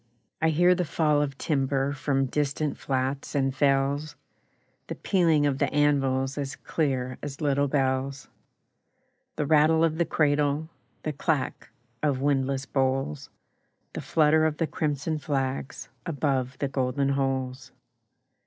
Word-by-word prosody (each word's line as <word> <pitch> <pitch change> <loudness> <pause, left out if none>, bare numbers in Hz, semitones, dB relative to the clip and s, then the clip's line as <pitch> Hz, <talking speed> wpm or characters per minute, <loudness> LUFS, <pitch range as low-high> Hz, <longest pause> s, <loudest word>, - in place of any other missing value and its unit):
I 160 - +4
hear 175 +3 +4
the 180 0 0
fall 150 -2 +1
of 140 -2 -2
timber 135 -2 0
From 135 -1 0
distant 145 +2 -1
flats 135 +2 -2
and 135 -1 +1
fells, 140 +2 +1 0.7
The - - -4
pealing 165 -6 +2
of 140 -2 0
the - - +1
anvils 135 -2 +1
As 140 -1 -4
clear 130 -5 -2
as 145 -1 -6
little 145 -1 +1
bells, 135 -1 -1 1.1
The 150 - -1
rattle 155 +2 +4
of 160 0 +1
the 170 - +3
cradle, 150 0 +1 0.3
The 155 - -2
clack 145 -1 -2 0.3
of 145 -4 +1
windlass 135 -1 0
boles, 130 - -1 0.6
The - - -4
flutter 155 0 +3
of 150 -1 -3
the 165 - +1
crimson 155 0 -2
flags 135 -2 -3 0.2
Above 135 -4 -1
the 140 - -1
golden 135 +1 0
holes. 135 -1 -2
140 Hz, 135 wpm, -26 LUFS, 135-150 Hz, 1.1 s, I